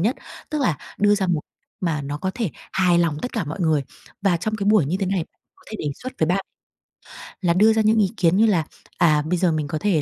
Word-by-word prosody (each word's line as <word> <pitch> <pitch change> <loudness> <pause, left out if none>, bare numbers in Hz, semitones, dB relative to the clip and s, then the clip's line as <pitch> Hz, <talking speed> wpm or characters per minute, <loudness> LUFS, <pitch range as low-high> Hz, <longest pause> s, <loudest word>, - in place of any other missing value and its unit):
nhất. 220 +9 +1 0.3
Tức 305 -2 -1
là 175 - +1 0.2
đưa 205 0 +4
ra 200 -2 0
một 175 -4 +1 0.4
mà 160 -5 -1
nó 145 +1 -4
có 190 +5 -2
thể 225 -8 -2 0.2
hài 180 -2 +3
lòng 165 -4 +1
tất 250 - -4
cả 220 - -1
mọi 155 +6 -6
người. 160 -4 +2 0.4
Và 195 -3 +3
trong 215 +6 -2
cái 200 -2 -3
buổi 210 -5 +5
như 170 +6 0
thế 195 - 0
này 185 -3 0 0.3
có - - -24
thể 220 - -5
đề - - -4 0.2
xuất 255 +1 -5
với 160 - +2
bạn 185 +4 0 1.0
là 175 -3 +2
đưa 215 +5 +5
ra 220 - +2
những 220 +1 +3
ý 200 0 +2
kiến 170 -1 +3
như 225 - +5
là, 190 -7 +3 0.3
à, 155 -3 +4
bây 180 +3 0
giờ 175 -1 +2
mình 155 -2 -1
có 155 - -3
thể 175 -2 +1
180 Hz, 260 wpm, -22 LUFS, 160-210 Hz, 1.0 s, buổi